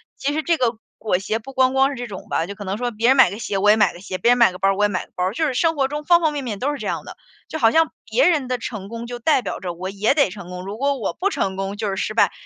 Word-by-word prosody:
其 280 - -2
实 310 - 0
这 335 +2 +1
个 245 -6 0 0.2
裹 210 -5 0
胁 215 +3 -2
不 230 +4 -10
光 260 0 +3
光 270 0 +4
是 280 - -5
这 245 - -5
种 195 -4 -9
吧， 165 - 0
就 200 +3 -7
可 205 - -8
能 195 +1 -3
说 245 +1 -2
别 230 +2 +1
人 265 - +5
买 265 - +7
个 200 +4 -7
鞋 210 -3 -2
我 205 +2 +5
也 - - +5
买 210 -5 +3
个 175 - -12
鞋， 185 -1 -5
别 235 +7 +3
人 245 - +4
买 235 -6 +5
个 - - -8
包 195 +1 +2
儿 195 - 0
我 205 - +3
也 - - +4
买 190 -3 -3
个 - - -32
包 180 - 0
儿， 190 - -1
就 315 +7 0
是 285 - -1
生 325 +6 +1
活 270 -2 +1
中 295 +1 -5
方 345 +1 +5
方 315 -2 +2
面 285 -3 -4
面 210 -5 -4
都 280 +3 0
是 290 - -4
这 - - -5
样 - - -2
的。 - - -11 0.3
就 315 - -4
好 225 - +5
像 320 +6 +3 0.2
别 - - +3
人 295 -7 +1
的 255 - -1
成 215 -4 -6
功 230 +1 -7
就 245 0 -6
代 270 +2 +3
表 - - -5
着 180 -3 -4
我 185 +2 -5
也 205 +5 +1
得 280 -8 +3
成 185 -1 -9
功， 180 0 -7
如 200 +3 -6
果 280 +2 0
我 215 - -3
不 390 +3 -1
成 190 - -2
功 195 +1 -3
就 210 0 -2
是 195 - -3
失 - - -2
败。 - - +3
230 Hz, 385 characters per minute, -21 LUFS, 195-275 Hz, 0.3 s, 买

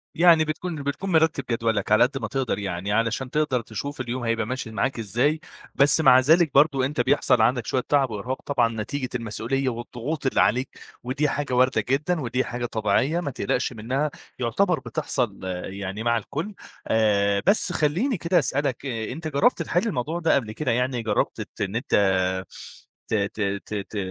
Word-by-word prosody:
يعني 165 -2 +6
بتكُون 155 0 -4
بتكُون 145 +7 -3
مرتِّب 160 -4 +3
جدولك 115 -4 0
على 110 - +6
قد 135 +2 0
ما 115 -5 -3
تقدَر 130 -3 -2
يعني 95 0 -3
علشان 115 +4 0
تقدَر 150 -3 0
تشوف 130 +6 -6
اليوم 125 0 -4
هيبقى 115 -1 0
ماشي 125 -1 -4
معاك 120 +2 -1
إزاي، 120 +9 +1 0.4
بس 140 +3 +5
مع 130 -4 +7
ذلك 160 +4 +4
برضه 140 -2 +4
أنت 135 -1 -1
بيحصَل 130 -1 +3
عندك 120 +1 +2
شويّة 130 - -1
تعَب 140 -3 +3
وإرهاق 120 +5 -4
طبعًا 115 -6 0
نتيجة 130 +4 -4
المسؤولية 120 +3 -1
والضغوط 120 +5 -5
اللي 135 - +3
عليك 125 +5 +2 0.3
ودي 140 +4 0
حاجة 140 -2 -2
واردة 130 +1 +3
جدًا 150 +5 +1
ودي 125 0 -1
حاجة 120 0 -4
طبيعية 115 +8 +1
ما 155 -6 -3
تقلَقش 125 +4 -1
منّها 130 +7 -2 0.3
يعتبر 175 +9 +1
بتحصَل 125 -3 -2 0.3
يعني 100 +2 -5
مع 120 0 +2
الكلّ 155 - -5 0.3
آآ، 100 -2 +2
بس 200 -2 +3
خلّيني 180 - +1
كده 170 +2 +2
أسألك، 140 -3 -1
أنت 130 +5 -4
جرّبت 170 - +2
تحِل 175 +7 0
الموضوع 160 - -2
ده 165 -1 +3
قبل 115 -6 -1
كده 130 +5 -2
يعني، 125 +1 0
جرّبت 105 -2 -1
تت - - -9
إن 100 +1 -2
أنت 120 - 0 1.1
ت - - -3
ت 105 0 -1 0.2
ت - - -8 0.2
ت 110 - -6
130 Hz, 175 wpm, -24 LUFS, 115-150 Hz, 1.1 s, مع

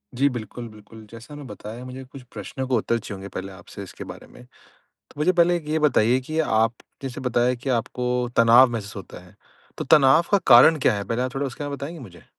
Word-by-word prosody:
जी। 140 +3 +3
बिल्कुल, 120 0 -7
बिल्कुल। 110 +1 -15
जैसा 115 +6 -11
मैं 145 -2 -9
बताया 110 +4 -9
मुझे 130 +1 -8
कुछ 130 +1 -13
प्रश्नों 115 +5 -6
का 130 - +1
उत्तर 115 +1 0
चाहिए 105 -1 -8
होंगे 95 +1 -9
पहले 95 +1 -5
आपसे 95 +2 -11
इसके 95 - -10
बारे - - -11
में। - - -16 0.5
तो - - -20
मुझे 175 +5 +3
पहले 175 0 +3
एक 155 -3 -11
ये 160 +1 0
बताइए 130 -4 +3
कि 155 +5 -4
आप 115 -5 +1 0.3
जैसे 130 -2 -6
बताया 125 0 +1
कि 130 +3 -6
आप 120 - +2
आपको 125 -1 -2
तनाव 120 +2 +7
महसूस 105 -3 -6
होता 95 - -9
है, - - -19 0.4
तो - - -3
तनाव 145 +3 +5
का 200 - +5
कारण 130 +6 +7
क्या - - +3
है? 100 -1 -3
पहले 115 +4 -2
आप 130 +1 -3
थोड़ा 140 +1 -1
उसके 135 +3 -7
बारे 145 - -4
में 140 - -5
बताएँगे 155 +4 -7
मुझे? 95 -9 -13
125 Hz, 235 wpm, -23 LUFS, 110-140 Hz, 0.5 s, तनाव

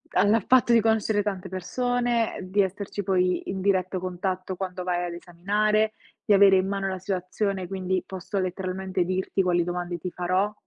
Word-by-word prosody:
al 205 +3 +4
fatto 250 -2 +5
di 230 - +7
conoscere 220 -2 +2
tante 190 -2 -4
persone, 240 +5 -1
di 190 +2 +1
esserci 195 +1 -3
poi 180 -1 0
in 190 0 -3
diretto 185 -1 +1
contatto 185 +1 -3
quando 180 -1 -4
vai 180 -1 -1
ad 175 - -5
esaminare, 210 +5 0 0.3
di 210 - +3
avere 195 -1 +7
in 185 +1 +1
mano 195 -1 -2
la 190 -1 -3
situazione, 190 +1 -2
quindi 185 -1 -2
posso 190 +1 -5
letteralmente 185 0 -2
dirti 185 +2 0
quali 175 -2 +2
domande 175 0 -3
ti 180 +2 -5
farò. 185 +4 0
190 Hz, 170 wpm, -26 LUFS, 180-205 Hz, 0.3 s, di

